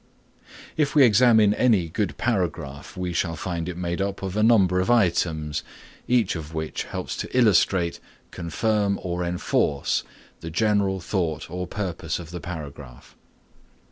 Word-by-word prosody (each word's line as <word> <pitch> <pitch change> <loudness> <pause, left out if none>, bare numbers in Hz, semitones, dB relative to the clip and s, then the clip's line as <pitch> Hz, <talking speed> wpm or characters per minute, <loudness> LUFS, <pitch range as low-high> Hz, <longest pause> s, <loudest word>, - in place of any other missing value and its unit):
If 150 -1 +1
we 145 - +7
examine 110 -2 +5
any 105 -8 +3
good 85 -2 -2
paragraph 85 - -2
we 90 -1 -3
shall 85 -1 -1
find 85 0 -4
it 90 - -6
made 85 +1 -2
up 100 0 -3
of 95 0 -4
a 105 - +1
number 100 -5 +4
of 95 - 0
items, 85 -9 +1 0.5
each 120 -7 +2
of 80 -1 -7
which 80 0 -3
helps - - -5
to - - -4
illustrate, 95 -6 +3 0.3
confirm 100 +4 0
or 90 -1 -2
enforce 85 -5 0 0.4
the 80 - -7
general 100 +1 +1
thought 85 -4 -2
or 90 0 -4
purpose 90 -4 -3
of 85 -2 -9
the 90 -1 -6
paragraph. 75 -7 -9
90 Hz, 145 wpm, -24 LUFS, 80-105 Hz, 0.5 s, we